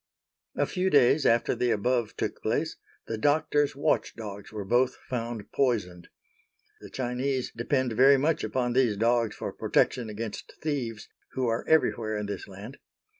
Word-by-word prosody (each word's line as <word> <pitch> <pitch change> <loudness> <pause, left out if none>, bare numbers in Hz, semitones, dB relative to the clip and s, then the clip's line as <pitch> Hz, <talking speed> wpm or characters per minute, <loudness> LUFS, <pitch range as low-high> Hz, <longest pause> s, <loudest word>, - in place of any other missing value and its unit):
A - - +2
few 185 0 -1
days 140 -1 +4
after 115 0 +3
the 125 - 0
above 120 +1 0
took - - -3
place, - - -1 0.3
the 115 - -4
doctor's 145 +1 +2
watchdogs 110 -8 -2
were 105 -2 -5
both 125 +5 +2
found 120 -3 -5
poisoned. 95 -10 0 0.7
The - - -11
Chinese 130 +1 -2
depend 125 +1 0
very 135 +4 +6
much 150 +3 +1
upon 120 +3 -1
these 120 -5 +2
dogs 115 0 +2
for - - -5
protection 120 -3 +1
against 105 0 -6
thieves, 125 -8 -3 0.3
who 130 - -1
are 115 -1 0
everywhere 115 -9 +2
in 105 - -3
this 100 -2 -5
land. 100 +7 -10
120 Hz, 150 wpm, -28 LUFS, 110-135 Hz, 0.7 s, very